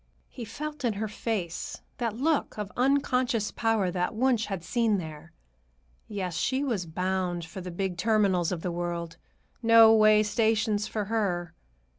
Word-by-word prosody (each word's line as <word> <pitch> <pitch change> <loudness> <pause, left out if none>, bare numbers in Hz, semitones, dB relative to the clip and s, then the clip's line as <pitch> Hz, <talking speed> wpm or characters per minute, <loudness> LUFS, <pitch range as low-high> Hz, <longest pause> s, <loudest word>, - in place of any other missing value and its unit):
He 240 - -8
felt 295 +6 -6
in 235 -3 +1
her 215 +2 -3
face 205 -5 -4 0.2
that 230 -3 -2
look 295 0 0
of 210 -1 -4
unconscious 250 -4 +1
power 225 -5 +1
that 180 +4 -2
Wunsch 240 -1 +2
had 195 -4 -4
seen 220 +4 +1
there. 160 -1 -8 0.8
Yes, 190 -5 -4
she 260 +10 0
was 215 -11 -2
bound 180 0 -2
for 175 +4 -8
the 180 - -6
big 180 0 -3
terminals 195 -4 +2
of 175 -3 -4
the 180 - -1
world; 170 -1 -4 0.4
no 230 -1 +7
way 215 -1 +6
stations 215 -1 +1
for 215 -2 -3
her. 185 -6 -1
210 Hz, 155 wpm, -28 LUFS, 180-230 Hz, 0.8 s, no